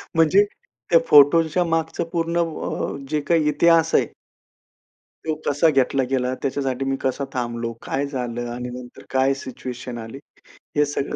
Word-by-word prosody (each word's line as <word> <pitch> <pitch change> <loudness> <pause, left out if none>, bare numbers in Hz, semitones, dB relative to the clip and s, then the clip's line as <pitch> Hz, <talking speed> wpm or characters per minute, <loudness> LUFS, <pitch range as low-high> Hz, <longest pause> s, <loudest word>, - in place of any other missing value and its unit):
म्हणजे 165 +5 +5 0.5
त्या 165 - +6
फोटोच्या 160 +4 +5
मागचं 165 0 -1
पूर्ण 170 0 -1
अ, 160 -3 -4
जे 150 -1 0
काही 155 +1 +2
इतिहास 165 +2 +3
आहे - - +3 1.2
तो 155 -1 -1
कसा 145 +3 +3
घेतला 135 -1 +2
गेला? 130 -1 0
त्याच्यासाठी 135 -1 -2
मी 135 0 0
कसा 135 +1 -1
थांबलो? 120 -2 -3
काय 140 +1 -1
झालं? 120 -3 -4
आणि 125 0 -5
नंतर 125 0 -10
काय 135 +1 +2
सिच्युएशन 125 -2 -7
आली? 115 +3 -8 0.6
हे 150 0 +4
सगळं 140 -1 -3
140 Hz, 145 wpm, -22 LUFS, 125-160 Hz, 1.2 s, त्या